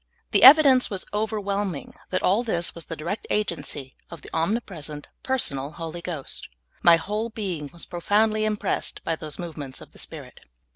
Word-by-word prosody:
The - - +4
evidence 270 -2 +9
was 195 -3 -2
overwhelming 205 -5 -2 0.2
that 185 - -1
all 200 +5 +4
this 175 -8 -1
was 170 - -8
the 165 - -5
direct 160 +7 -4
agency 150 -9 -2
of 170 - -10
the - - -11
omnipresent, 165 -5 -2
personal 145 - 0
Holy 165 +2 -6
Ghost. 170 -6 -4 0.4
M3" 170 -1 +8
whole 210 +6 -3
being 185 -10 -4
was 170 - -6
profoundly 215 +5 +1
impressed 215 -1 -2
by 165 - 0
those 155 -2 -6
movements 150 -6 -6
of - - -13
the - - -15
Spirit. - - -8
175 Hz, 160 wpm, -25 LUFS, 160-215 Hz, 0.4 s, evidence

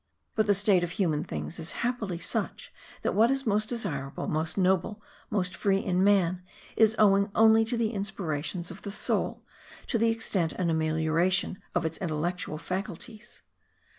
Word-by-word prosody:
But 215 -1 +1
the 205 - +4
state 195 -2 +3
of 175 - -2
human 160 -6 +1
things 170 - -5
is 160 +1 -2
happily 225 -8 -2
such 170 - -4 0.3
that - - 0
what 225 +3 +4
is 270 0 +1
most 215 0 +1
desirable, 145 - -3
most 155 +3 -2
noble, 190 +2 +1 0.3
most 185 -3 -1
free 195 -1 +1
in 185 -1 0
man, 185 -3 +3 0.3
is 220 0 +4
owing 200 -1 +4
only 225 0 +6
to 235 +2 -2
the 225 -2 0
inspirations 175 -4 -2
of - - -10
the 200 - -5
soul, - - 0 0.4
to 230 - 0
the 230 +1 +3
extent 205 -7 0
and 175 -3 -1
amelioration 160 +4 +1
of - - +1
its 160 0 -3
intellectual 170 -1 -3
faculties. 205 +6 -6
190 Hz, 165 wpm, -28 LUFS, 170-215 Hz, 0.4 s, only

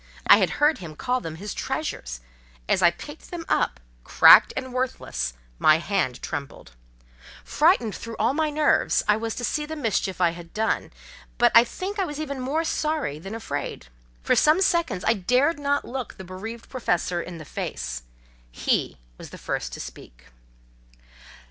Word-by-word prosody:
I - - +8
had - - +2
heard 300 +2 +3
him 165 -4 -9
call 250 +9 -1
them 160 -1 -6
his 200 +5 -6
treasures: - - -4 0.5
as - - +2
I 175 - +7
picked 295 - -11
them 340 -2 -6
up, 65 - 0 0.2
cracked - - +7
and 260 -1 -4
worthless, 255 - -2 0.3
my 155 0 +6
hand 170 -8 -2
trembled. 140 -1 -6 0.7
Frightened 300 - +2
through 230 -1 -7
all - - +2
my 310 +1 0
nerves 300 0 +2
I 210 - +5
was 225 0 -3
to 245 - -5
see 300 +5 -1
the 315 - -5
mischief 220 -9 -1
I 175 -2 +3
had 170 0 -12
done, 220 +1 -1 0.5
but 240 0 +4
I 230 - +9
think 385 - -5
I 385 - +2
was 295 -3 -6
even 280 -3 -4
more 280 +6 -1
sorry 305 - -2
than 195 +6 -7
afraid. 220 - -5 0.3
For - - +3
some 305 +4 +4
seconds 340 - +1
I 225 - +4
dared 250 - +1
not 285 0 0
look 255 -1 -6
the 190 - -8
bereaved 215 +6 -8
Professor 180 -8 -1
in 175 0 -8
the 155 - -10
face; 60 - -5 0.5
he - - -1 0.2
was - - -9
the - - -10
first - - -4
to - - -7
speak. 60 0 -11
230 Hz, 175 wpm, -25 LUFS, -, 0.7 s, I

